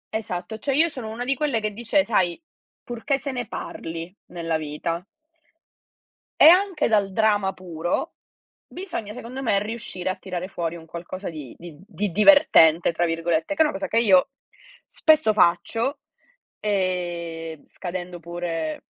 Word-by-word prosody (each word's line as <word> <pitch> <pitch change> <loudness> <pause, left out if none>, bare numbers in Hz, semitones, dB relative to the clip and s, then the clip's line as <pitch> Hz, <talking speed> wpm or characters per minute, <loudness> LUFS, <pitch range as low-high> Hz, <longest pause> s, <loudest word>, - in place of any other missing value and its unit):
Esatto, 200 0 -4
cioè, 275 - -1
io 330 +3 +4
sono 245 -7 -7
una 235 +3 -5
di 270 - +2
quelle 275 -4 0
che 215 0 -2
dice: 235 +6 +1
"Sai 180 -6 +1 0.4
purché 240 +3 -2
se 275 +1 -4
ne 245 -3 -4
parli 165 +2 -6
nella 165 -2 -2
vita." 155 +3 -4 1.4
E - - +8
anche 360 -2 +5
dal 205 -3 +2
drama 205 -2 +2
puro 175 -2 -3 0.5
bisogna 345 - -6
secondo 250 +2 -7
me 200 -5 +2
riuscire 210 -4 -5
a 185 - -1
tirare 185 -1 -5
fuori 170 -3 -4
un 165 -1 -11
qualcosa 175 +3 -6
di 150 -6 -9
di 170 -3 -11
di 205 -1 -3
"divertente" 175 - +6
tra 170 +1 0
virgolette 165 - 0
che 305 - +1
è - - +9
una 300 - +1
cosa 195 - -4
che 230 - +2
io 200 0 +5 0.6
spesso 310 -9 +3
faccio, 225 - +2 0.6
ehm, 175 -5 -2
scadendo 180 -1 -6
pure 165 -2 -4
190 Hz, 150 wpm, -24 LUFS, 170-235 Hz, 1.4 s, è